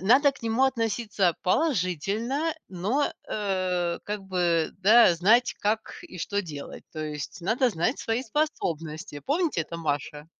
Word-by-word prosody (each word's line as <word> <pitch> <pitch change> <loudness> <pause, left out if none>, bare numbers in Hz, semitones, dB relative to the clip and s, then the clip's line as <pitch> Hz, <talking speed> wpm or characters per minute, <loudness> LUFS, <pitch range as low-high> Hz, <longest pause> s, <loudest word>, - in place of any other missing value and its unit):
надо 265 - +5
к 270 - -18
нему 230 +3 +2
относиться 225 -7 0
положительно, 230 - 0 0.2
но, 205 +11 0 0.2
э, 185 -4 -1
как 210 -1 -4
бы, 175 -4 +1
да, 210 -1 +6
знать, 220 +9 +4
как 215 +2 -1
и 180 - -11
что 200 +4 -1
делать, 145 -5 -8
то 155 - -4
есть 150 +3 -6
надо 230 +8 +2
знать 205 - 0
свои 225 +2 -1
способности. 165 - -3
"Помните 300 - 0
это, 170 +2 -7
Маша?" 150 -1 -3
200 Hz, 140 wpm, -27 LUFS, 170-240 Hz, 0.2 s, да